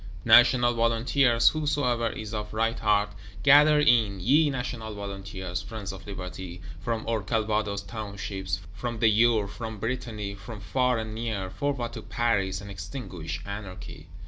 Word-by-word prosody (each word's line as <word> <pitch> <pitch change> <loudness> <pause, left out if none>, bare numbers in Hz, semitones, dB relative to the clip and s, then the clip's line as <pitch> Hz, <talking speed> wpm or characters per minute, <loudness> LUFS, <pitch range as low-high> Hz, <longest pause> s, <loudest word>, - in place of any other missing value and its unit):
National 120 +1 +6
Volunteers, 115 +1 +3
whosoever 140 -6 0
is 110 0 -7
of 105 0 -4
right 115 +1 0
heart: 105 -1 +2 0.3
gather 150 +1 +7
in, 115 -9 +3
ye 145 - +4
National 120 -5 -4
Volunteers, 95 -3 -5
friends 100 -1 -6
of 95 +1 -11
Liberty; 90 -2 -7 0.2
from 110 +4 -3
our 115 -2 0
Calvados 105 -1 -1
Townships, 100 -2 -5
from 120 +3 -4
the 115 - +1
Eure, 110 -1 +3
from 110 +1 -6
Brittany, 115 -3 -3
from 105 +2 -9
far 125 +3 +1
and 110 -1 -4
near: 110 -5 -3
forward 120 +4 -2
to - - -6
Paris, 95 -5 0
and 100 0 -9
extinguish 90 - -6
Anarchy! 100 -2 -8
110 Hz, 145 wpm, -27 LUFS, 100-120 Hz, 0.3 s, gather